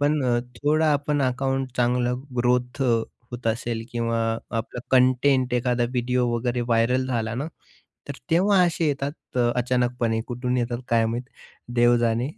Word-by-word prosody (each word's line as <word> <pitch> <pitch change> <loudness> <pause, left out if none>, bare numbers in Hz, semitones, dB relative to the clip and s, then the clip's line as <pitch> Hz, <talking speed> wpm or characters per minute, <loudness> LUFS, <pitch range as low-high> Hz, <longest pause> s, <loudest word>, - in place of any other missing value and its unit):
पण 145 0 +2
अ, 120 -1 +2 0.2
थोडा 155 +1 +3
आपण 145 0 0
अकाउंट 135 0 -1
चांगला 125 0 +1 0.2
ग्रोथ 125 +2 +1 0.5
होत 120 -1 -7
असेल 115 0 -1
किंवा 115 -1 -1 0.4
आपलं 115 +2 -4
कंटेंट, 130 0 +3
एखादा 125 0 +1
व्हिडिओ 125 0 0
वगैरे 120 +1 -1
व्हायरल 120 +2 +1
झाला 115 -4 -2
ना. 135 +5 -3 0.6
तर 140 - -4 0.2
तेव्हा 190 +4 +4
असे 170 -2 +1
येतात. 140 0 -1 0.4
अचानकपणे 125 -2 0
कुठून 125 0 -2
येतात 120 -1 -1
काय 115 -1 +3
माहीत. 120 +2 -2 0.5
देव 120 0 +5
जाणे. 115 +2 +1
125 Hz, 140 wpm, -24 LUFS, 120-135 Hz, 0.6 s, देव